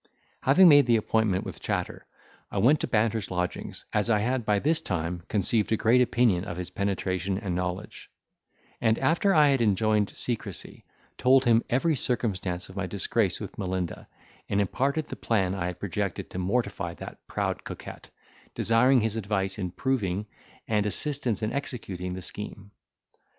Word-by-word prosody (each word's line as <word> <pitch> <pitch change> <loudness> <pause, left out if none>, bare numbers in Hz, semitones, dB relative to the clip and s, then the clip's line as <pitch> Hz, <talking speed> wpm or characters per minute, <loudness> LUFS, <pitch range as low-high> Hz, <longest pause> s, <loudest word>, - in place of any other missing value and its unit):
Having 145 +8 +6
made 145 -4 +7
the 120 - +5
appointment 110 -3 +1
with - - -7
Chatter - - -3 0.4
I - - -5
went 130 +9 +4
to - - -2
Banter's 110 -2 0
lodgings, 90 -1 -4
as 105 +2 +1
I 110 - +4
had 120 +2 -1
by 105 -1 +3
this 155 +9 +1
time 85 -1 -3
conceived 105 +2 +1
a 110 - +3
great 120 +4 +4
opinion 120 -7 +2
of 90 -3 -6
his 90 -1 -5
penetration 95 -1 -1
and 100 -4 -3
knowledge; 90 +3 -4 0.7
and, 115 -1 +3
after 170 +4 +2
I 150 -2 +6
had 135 -3 +2
enjoined 105 -1 +2
secrecy, 105 - -4 0.3
told 130 +1 +5
him 115 -1 +5
every 150 +6 +2
circumstance 95 -9 -2
of 95 - -13
my 95 -2 -2
disgrace 100 +1 0
with 100 -1 -8
Melinda, 95 -3 -3 0.4
and 100 - +1
imparted 140 +9 0
the - - -5
plan 95 -5 0
I 90 -3 -2
had 90 -1 -6
projected 100 -2 -3
to 90 - -4
mortify 100 +7 -1
that - - -9
proud - - -2
coquette, - - -9 0.5
desiring 125 +3 +4
his 110 0 -1
advice 100 -2 -2
in 90 -2 -2
proving, 105 -3 -1 0.4
and 105 -2 +1
assistance 125 0 -2
in 110 - -1
executing 95 -10 -4
the 95 - -6
scheme. 100 0 -6
105 Hz, 165 wpm, -27 LUFS, 95-120 Hz, 0.7 s, made